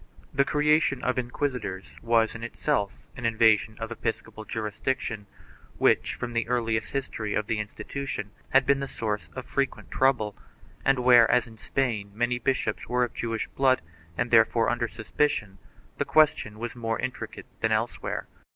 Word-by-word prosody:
2 - - -17
The 140 - +5
creation 150 -2 +2
of 125 0 +1
inquisitors 120 -6 -3
was 115 -1 +3
in 115 - -8
itself 115 -4 -1
an 130 - -8
invasion 110 -1 +3
of 115 0 -5
episcopal 110 -1 -4
jurisdiction, 110 0 -3 0.5
which, - - +3
from 120 0 -5
the 115 0 0
earliest 115 -2 0
history 115 -6 -3
of 105 - 0
the 110 0 -1
institution, 105 0 -5 0.2
had 135 0 +5
been 140 0 +3
the 140 - -3
source 105 -4 -3
of 130 - -5
frequent 140 -1 -2
trouble, 120 -6 +2 0.5
and 135 0 +4
where, 125 -2 +7
as 125 -1 +4
in 115 -2 -13
Spain, 110 -4 -1
many 120 +2 0
bishops 130 +2 -1
were 125 0 +2
of 120 - -2
Jewish 115 -1 -2
blood 130 -2 +3 0.4
and 120 0 -1
therefore 115 0 +5
under 120 -1 0
suspicion, 110 -3 -1 0.4
the - - +3
question. 145 -9 +3
was 120 +2 -5
more 115 -2 -2
intricate 130 0 -5
than - - +1
elsewhere. - - -1
120 Hz, 160 wpm, -27 LUFS, 110-130 Hz, 0.5 s, where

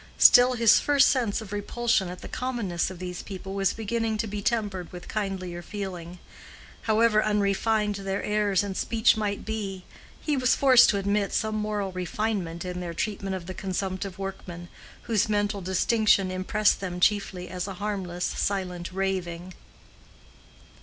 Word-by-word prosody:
Still 250 +1 +7
his 230 -3 +5
first 285 -1 +4
sense 235 -6 0
of 210 -2 -9
repulsion 205 -1 0
at 180 0 -8
the - - -6
commonness 235 -10 -2
of 185 - -9
these 180 0 -6
people 190 -1 -7
was 195 -2 +1
beginning 225 0 -2
to 220 - -1
be 210 -1 -4
tempered 200 -5 -1
with 180 0 -9
kindlier 190 -4 -3
feeling. 180 -2 -6 0.7
However 220 0 +4
unrefined 210 0 +1
their 195 0 -3
airs 210 -2 +1
and 200 -2 -4
speech 225 +3 +3
might 210 -2 -2
be, 200 -4 -4 0.4
he 300 - -1
was 255 -2 +3
forced 255 -3 +6
to 200 - +2
admit 200 +1 0
some 220 -1 0
moral 210 -2 -2
refinement 185 -1 -3
in 180 0 -4
their 170 -2 -5
treatment 195 0 -2
of 180 -2 -6
the 185 - -6
consumptive 190 0 -4
workman, 185 -3 -7 0.3
whose 220 -1 +1
mental 205 -1 0
distinction 195 +1 +2
impressed 205 +3 +1
them 180 -2 -4
chiefly 190 -2 +1
as 180 +1 -4
a 195 - -6
harmless, 185 -3 -3
silent 180 -3 -2
raving. 185 -2 -3
200 Hz, 155 wpm, -26 LUFS, 185-215 Hz, 0.7 s, Still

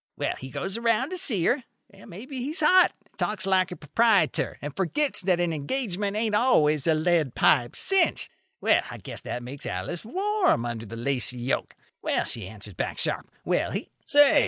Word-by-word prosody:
Well, - - -1
he 130 - -8
goes 190 - -3
around 235 +5 +1
to 370 - -3
see 225 - +1
her. 255 +1 +2 0.3
Well, 195 - -15
maybe 255 +9 -8
he's 300 +8 -3
hot, 365 +4 +6
and - - -33
talks 205 -3 -1
like 190 -1 +2
the 180 - -6
proprietor, 195 +3 +2
and 145 0 -7
forgets 275 - +2
that 180 -2 +1
an 175 -2 0
engagement 200 - -2
ain't 220 -1 0
always 155 - +3
a 160 - +4
lead 155 -4 +1
pipe 120 -4 +3
cinch. 385 -3 +2 0.3
Well, - - +3
I - - -7
guess - - -8
that 120 - -5
makes 135 +3 -7
Alice 95 - -4
warm 375 - +1
under 115 -2 -5
the 115 +3 -8
lacy 125 0 0
yoke. 120 +2 -2 0.3
Well, - - 0
she 110 -6 -4
answers 105 0 -11
back - - -3
sharp. - - -1 0.2
Well, - - +1
he—" - - -5 0.2
"Say!" 290 -1 +6
185 Hz, 190 wpm, -26 LUFS, -, 0.3 s, hot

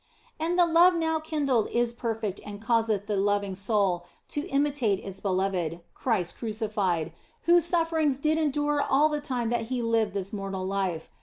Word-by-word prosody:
And 335 +3 0
the 350 - +6
love 340 +2 +5
now 320 -1 0
kindled 285 -7 0
is 240 0 0
perfect 225 -4 -3
and 205 -1 -8
causeth 225 -3 +1
the 205 -1 -1
loving 200 0 +1
soul 195 -3 0 0.2
to 295 - -3
imitate 275 -7 +1
its 195 -1 -7
Beloved, 185 -4 -1
Christ 205 -9 -1
crucified, 210 -7 -1 0.3
whose 345 0 +5
sufferings 325 -5 +1
did 310 +3 +1
endure 295 -1 +1
all 285 +3 +3
the 300 -1 -2
time 245 -5 -2
that 235 -1 0
He 245 0 -2
lived 225 -3 +1
this 195 0 -3
mortal 195 -2 -4
life. 190 -4 -2
230 Hz, 165 wpm, -27 LUFS, 195-295 Hz, 0.3 s, the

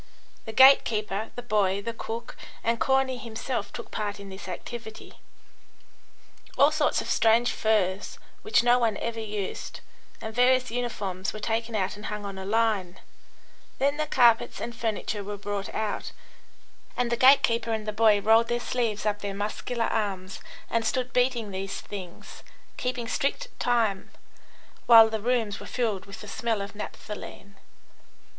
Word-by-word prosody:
The 220 - -5
gate 265 +4 +8
keeper, 215 -1 -2
the 245 - -6
boy, 200 -4 +1
the 230 +3 -4
cook, 230 +1 -6 0.3
and 230 0 +1
Corney 265 -1 +1
himself 235 +1 -4
took 235 - -8
part 205 -1 -3
in 200 -1 -9
this 190 0 -9
activity. 220 +4 -8 1.4
All 280 +3 +6
sorts 305 -1 +1
of - - -7
strange 230 +2 +3
furs, 200 -3 0 0.2
which 430 - +3
no 245 +1 +5
one 225 -3 +1
ever 230 -1 -4
used, 210 -3 -5 0.4
and 220 - -6
various 250 +1 +3
uniforms 205 -6 -3
were 215 - -6
taken 225 +1 -2
out 195 0 -1
and 210 - -7
hung 210 -1 -5
on 195 -1 -6
a 190 - -6
line, 210 -4 0 0.8
then 280 +2 +1
the 305 0 -1
carpets 235 -3 +3
and 235 0 -5
furniture 220 -2 -2
were 205 +1 -5
brought 205 -1 -4
out, 215 -2 -3 0.8
and 245 -1 0
the - - +3
gate 260 +4 +6
keeper 230 0 +1
and 220 -1 -2
the 215 - -2
boy 215 -1 +4
rolled 225 +3 +4
their 240 0 0
sleeves 230 -4 -2
up 205 -1 0
their 200 -1 -4
muscular 220 +3 -2
arms 195 -4 -2 0.3
and 230 0 0
stood 250 +3 -1
beating 245 -4 +1
these 195 +1 -4
things, 185 -4 -9 0.3
keeping 250 -2 -3
strict 385 - -1
time, 225 -5 +1 0.8
while 225 -2 +9
the 220 -1 -2
rooms 225 -3 0
were - - -9
filled 220 -7 -2
with 200 +2 -10
the - - -9
smell 225 -4 -1
of 200 - -8
naphthaline. 210 -1 -8
225 Hz, 160 wpm, -27 LUFS, 205-240 Hz, 1.4 s, while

